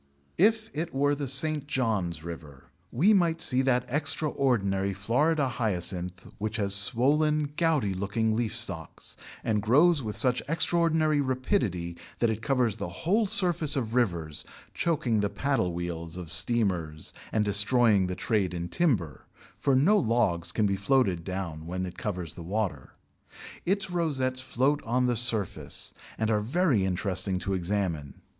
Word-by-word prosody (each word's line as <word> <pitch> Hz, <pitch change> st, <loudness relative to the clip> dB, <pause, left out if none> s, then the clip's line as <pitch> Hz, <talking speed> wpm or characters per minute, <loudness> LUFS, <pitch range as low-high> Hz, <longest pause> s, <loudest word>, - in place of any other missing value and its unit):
If 220 Hz, +3 st, +3 dB
it 165 Hz, 0 st, -3 dB
were 145 Hz, +1 st, +2 dB
the 145 Hz, -1 st, -3 dB
St. 145 Hz, +2 st, -1 dB
John's 105 Hz, -, -1 dB
River, 75 Hz, -5 st, -10 dB, 0.2 s
we 180 Hz, -, +4 dB
might 170 Hz, -4 st, +2 dB
see 130 Hz, 0 st, +3 dB
that 125 Hz, -2 st, +1 dB
extraordinary 125 Hz, -9 st, 0 dB
Florida 140 Hz, -, +1 dB
Hyacinth 90 Hz, -6 st, -3 dB
which 110 Hz, +1 st, -3 dB
has 100 Hz, -2 st, 0 dB
swollen, 145 Hz, +8 st, +2 dB
gouty 150 Hz, -, +1 dB
looking 110 Hz, +4 st, -1 dB
leaf 115 Hz, -1 st, -1 dB
stalks, 95 Hz, -9 st, -3 dB, 0.3 s
and 105 Hz, -2 st, 0 dB
grows 145 Hz, -, +4 dB
with 110 Hz, -3 st, -4 dB
such 125 Hz, -1 st, +3 dB
extraordinary 160 Hz, -2 st, +2 dB
rapidity 110 Hz, -10 st, -1 dB, 0.2 s
that 115 Hz, -2 st, +2 dB
it 110 Hz, 0 st, -4 dB
covers 120 Hz, -3 st, +1 dB
the 100 Hz, -, -4 dB
whole 205 Hz, +6 st, 0 dB
surface 175 Hz, -7 st, +3 dB
of 115 Hz, -5 st, -2 dB
rivers, 85 Hz, -11 st, 0 dB, 0.3 s
choking 135 Hz, -10 st, 0 dB
the 100 Hz, 0 st, 0 dB
paddle 110 Hz, -3 st, 0 dB
wheels 85 Hz, -1 st, -5 dB
of 90 Hz, -3 st, -7 dB
steamers 90 Hz, -10 st, 0 dB, 0.2 s
and 110 Hz, -1 st, +1 dB
destroying 105 Hz, -1 st, +4 dB
the 90 Hz, -, -3 dB
trade 95 Hz, -5 st, -1 dB
in 85 Hz, 0 st, -4 dB
timber, 90 Hz, -, -1 dB, 0.3 s
for 140 Hz, -, +2 dB
no 190 Hz, +11 st, +4 dB
logs 110 Hz, -, +1 dB
can 110 Hz, -, +1 dB
be 100 Hz, -1 st, +1 dB
floated 100 Hz, -5 st, +1 dB
down 85 Hz, -4 st, -5 dB
when 90 Hz, +1 st, -3 dB
it 90 Hz, -1 st, -8 dB
covers 90 Hz, -6 st, -4 dB
the -, -, -10 dB
water. 85 Hz, -6 st, -3 dB, 0.7 s
Its 195 Hz, -1 st, 0 dB
rosettes 135 Hz, -7 st, -1 dB
float 135 Hz, +3 st, 0 dB
on 125 Hz, +2 st, +1 dB
the 125 Hz, -1 st, +1 dB
surface, 110 Hz, -5 st, 0 dB, 0.2 s
and 110 Hz, 0 st, 0 dB
are 105 Hz, -1 st, +2 dB
very 135 Hz, -, +1 dB
interesting 95 Hz, 0 st, -1 dB
to 95 Hz, +1 st, -3 dB
examine. 90 Hz, -6 st, -2 dB
110 Hz, 150 wpm, -28 LUFS, 95-140 Hz, 0.7 s, we